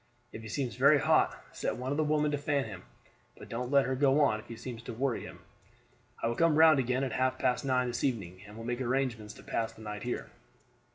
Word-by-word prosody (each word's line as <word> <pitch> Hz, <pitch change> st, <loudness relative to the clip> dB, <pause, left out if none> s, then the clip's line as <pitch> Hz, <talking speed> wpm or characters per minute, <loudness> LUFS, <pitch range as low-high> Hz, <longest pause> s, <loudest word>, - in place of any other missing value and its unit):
If 110 Hz, -, -7 dB
he 110 Hz, -, -9 dB
seems 125 Hz, +1 st, -3 dB
very 140 Hz, +3 st, +6 dB
hot -, -, +2 dB
set -, -, -3 dB
one 130 Hz, +2 st, -3 dB
of 145 Hz, -, -1 dB
the 155 Hz, -, +2 dB
women 150 Hz, 0 st, +1 dB
to 145 Hz, -, 0 dB
fan 145 Hz, -1 st, 0 dB
him, 95 Hz, -5 st, -8 dB, 0.6 s
but -, -, -12 dB
don't 120 Hz, +2 st, -3 dB
let 140 Hz, 0 st, +4 dB
her 130 Hz, -, -1 dB
go 135 Hz, +2 st, +3 dB
on 110 Hz, -7 st, +3 dB
if 110 Hz, -, -14 dB
it 115 Hz, -1 st, -8 dB
seems 120 Hz, -1 st, -7 dB
to 120 Hz, -, -7 dB
worry 130 Hz, +1 st, -1 dB
him. -, -, -10 dB, 0.8 s
I -, -, +2 dB
will 115 Hz, -, 0 dB
come 165 Hz, +4 st, +3 dB
round 160 Hz, -2 st, +7 dB
again 130 Hz, +1 st, 0 dB
at 130 Hz, -, -2 dB
half 130 Hz, +1 st, 0 dB
past 125 Hz, -, 0 dB
nine 130 Hz, -2 st, +1 dB
this 120 Hz, -1 st, -3 dB
evening 95 Hz, -9 st, -2 dB
and 105 Hz, +1 st, -12 dB
will 115 Hz, -, -7 dB
make 120 Hz, +2 st, -3 dB
arrangements 120 Hz, -4 st, -1 dB
to -, -, -14 dB
pass 115 Hz, 0 st, -2 dB
the 110 Hz, -, -13 dB
night 105 Hz, -1 st, -6 dB
here. 120 Hz, -, -4 dB
125 Hz, 245 wpm, -30 LUFS, 115-140 Hz, 0.8 s, round